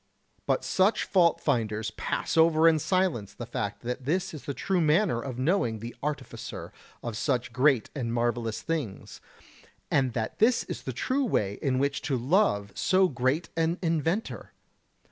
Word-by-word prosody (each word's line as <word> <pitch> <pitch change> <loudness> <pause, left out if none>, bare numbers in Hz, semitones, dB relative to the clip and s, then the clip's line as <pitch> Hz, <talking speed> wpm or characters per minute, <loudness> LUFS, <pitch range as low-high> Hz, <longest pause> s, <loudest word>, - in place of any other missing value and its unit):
But - - +1
such 190 +4 +2
fault 175 -4 +3
finders 110 -5 -1
pass - - -3
over 160 0 +5
in 160 -1 +5
silence 150 - 0
the 120 - -6
fact 105 -3 -4
that 125 +2 -4
this 175 +6 0
is 155 - -9
the 140 - -3
true 190 -2 0
manner 160 - +2
of 125 -1 -6
knowing 130 - +1
the 115 +3 -8
Artificer 150 +1 -5 0.3
of 120 -2 -4
such 125 0 -1
great 130 -2 +3
and 125 -6 -3
marvellous 120 -1 -1
things, 150 -12 -4 0.7
and 130 -3 +2
that 110 -2 -3
this 235 +3 +4
is - - -6
the - - -4
true 275 +1 0
way 105 - 0
in 130 -2 +1
which 140 +1 0
to 135 - +1
love 125 - +2
so 185 - +3
great 130 +5 0
an 165 +1 +1
Inventor! 165 +5 -1
140 Hz, 165 wpm, -28 LUFS, 120-170 Hz, 0.7 s, over